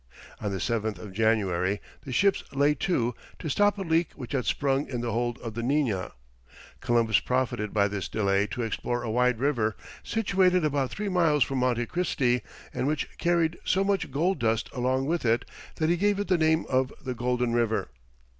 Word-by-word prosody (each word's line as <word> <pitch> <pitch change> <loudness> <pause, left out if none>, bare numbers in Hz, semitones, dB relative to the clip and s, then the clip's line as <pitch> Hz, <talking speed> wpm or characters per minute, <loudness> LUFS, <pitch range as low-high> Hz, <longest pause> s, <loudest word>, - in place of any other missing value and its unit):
On 105 - -2
the 95 - -2
7th 110 +1 -1
of 95 +1 -9
January 100 -3 +1 0.3
the 135 - -6
ships 195 +10 +2
lay 140 +2 +3
to, 130 -6 0 0.2
to 160 - -5
stop 205 +7 +3
a 195 - -3
leak 165 -1 +1
which 125 -4 -8
had 130 -4 -1
sprung 140 0 0
in 120 -3 -3
the 120 -1 -2
hold 120 +1 -1
of 115 -2 -5
the 115 - -3
Nina. 120 - 0 0.7
Columbus 115 -3 +2
profited 125 -5 -1
by 100 -1 +3
this 100 -1 -4
delay 100 -1 +1
to 110 +5 -4
explore 120 +2 -2
a 115 - -2
wide 125 +1 +2
river, 120 -5 0 0.3
situated 190 -5 +2
about 140 -3 0
three 210 0 -4
miles 165 -7 +3
from 135 -1 -2
Monte 120 -2 +1
Christi, 130 -7 0 0.3
and 130 - -1
which 150 -1 -2
carried 170 -1 +1
so 190 +1 +2
much 195 -5 0
gold 170 +8 0
dust 115 -1 0
along 130 +1 0
with 170 +3 -1
it, 115 +1 +2 0.3
that 155 0 0
he 175 - +2
gave 205 +2 +2
it 205 -1 -3
the 185 - +4
name 160 0 +3
of 130 0 +1
the 130 - -3
Golden 125 0 0
River. 115 - 0
125 Hz, 190 wpm, -27 LUFS, 115-160 Hz, 0.7 s, the